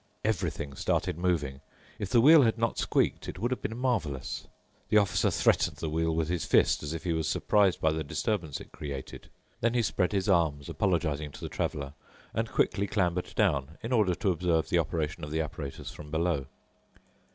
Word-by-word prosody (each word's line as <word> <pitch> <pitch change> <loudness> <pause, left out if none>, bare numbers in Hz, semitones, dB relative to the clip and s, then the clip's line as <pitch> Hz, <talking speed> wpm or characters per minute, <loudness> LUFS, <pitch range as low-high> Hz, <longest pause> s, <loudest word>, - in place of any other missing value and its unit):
Everything 85 -9 -1
started - - 0
moving. 80 -6 -1 0.4
If 100 - -3
the 120 - +5
wheel 155 +4 +8
had 115 -3 +2
not 115 0 0
squeaked, - - +1
it - - -6
would 120 +2 -1
have 130 - -2
been 110 - -4
marvelous. 85 - -2 0.4
The 105 - +5
officer 100 -3 +3
threatened - - +2
the 80 - -3
wheel 80 0 0
with 80 -1 0
his 85 0 -1
fist, - - +3
as 75 +2 -4
if 80 - -6
he 85 - 0
was 80 -1 -1
surprised 100 +2 +2
by 80 - +2
the 80 0 -2
disturbance 80 +1 -2
it - - -12
created. 70 -3 -7 0.3
Then 115 +1 +1
he 120 - +3
spread 95 -3 +1
his 100 -1 0
arms, 80 -7 +2
apologizing 80 -7 0
to - - -11
the - - -4
traveler, 70 -1 -3 0.4
and - - -1
quickly 100 - +1
clambered 90 -3 -1
down, 80 -7 +1
in 115 - -4
order 105 -7 +3
to 100 -1 +1
observe 85 -2 0
the 85 - +3
operation 80 0 -2
of 75 - -4
the 80 +2 0
apparatus 75 -2 -6
from 75 - -10
below. 80 -3 0
85 Hz, 195 wpm, -29 LUFS, 75-100 Hz, 0.4 s, wheel